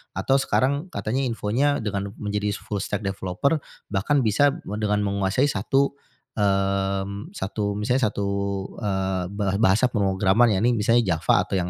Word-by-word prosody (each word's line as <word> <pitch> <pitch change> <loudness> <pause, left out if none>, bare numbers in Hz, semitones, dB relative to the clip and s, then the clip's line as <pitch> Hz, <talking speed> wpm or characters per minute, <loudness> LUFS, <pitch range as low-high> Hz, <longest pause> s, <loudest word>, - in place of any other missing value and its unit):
atau 135 - +1
sekarang 140 +4 +1
katanya 125 -7 -2
infonya 120 +4 0
dengan 100 -1 -3
menjadi 105 -1 -2
full 105 -1 -5
stack 100 +2 -3
developer 100 - -1 0.3
bahkan 125 +8 +1
bisa 135 +7 +3 0.2
dengan 105 -1 0
menguasai 100 +5 +1
satu, 135 +6 +1 0.4
mmm, 100 - 0
satu, 100 - -2
misalnya 125 +2 +1
satu, 100 - -3 0.6
eee, 95 -2 -1
ba 100 -1 -1
bahasa 110 +3 +4
pemrograman, 100 +2 +3
ya, 95 - +1
ini 120 +1 +4
misalnya 115 +2 +3
Java 80 - +2
atau - - -2
yang 90 -1 -1
105 Hz, 145 wpm, -24 LUFS, 95-120 Hz, 0.6 s, bahasa